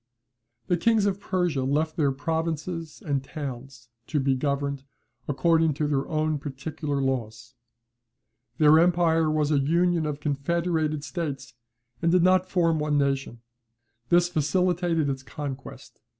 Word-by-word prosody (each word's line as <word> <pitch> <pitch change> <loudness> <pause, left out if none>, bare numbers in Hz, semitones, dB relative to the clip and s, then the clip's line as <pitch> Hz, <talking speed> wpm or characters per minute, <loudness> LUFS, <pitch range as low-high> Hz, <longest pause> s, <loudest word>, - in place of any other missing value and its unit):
The 175 - +1
kings 220 +3 +3
of 200 -1 0
Persia 175 -8 -1
left 155 +4 0
their 145 -5 +2
provinces 160 +2 -3
and 140 -3 -1
towns 135 -4 -7 0.2
to 150 - 0
be 135 0 +2
governed 140 0 -2 0.4
according 160 +1 +2
to 150 - -1
their 140 -2 0
own 155 -1 0
particular 145 +1 -4
laws. 120 -3 -3 1.0
Their 155 0 +6
empire 165 -2 +3
was 155 -1 +1
a 145 - +3
union 170 +3 +2
of 150 -1 -4
confederated 155 +1 -1
states, 140 - -5 0.5
and 170 0 +2
did 180 -1 +4
not 185 0 +3
form 165 -3 +2
one 150 -1 0
nation; 135 -4 -1 0.7
this 175 0 +4
facilitated 175 0 +1
its 135 -1 -2
conquest. 130 +2 -8
155 Hz, 135 wpm, -26 LUFS, 140-170 Hz, 1.0 s, Their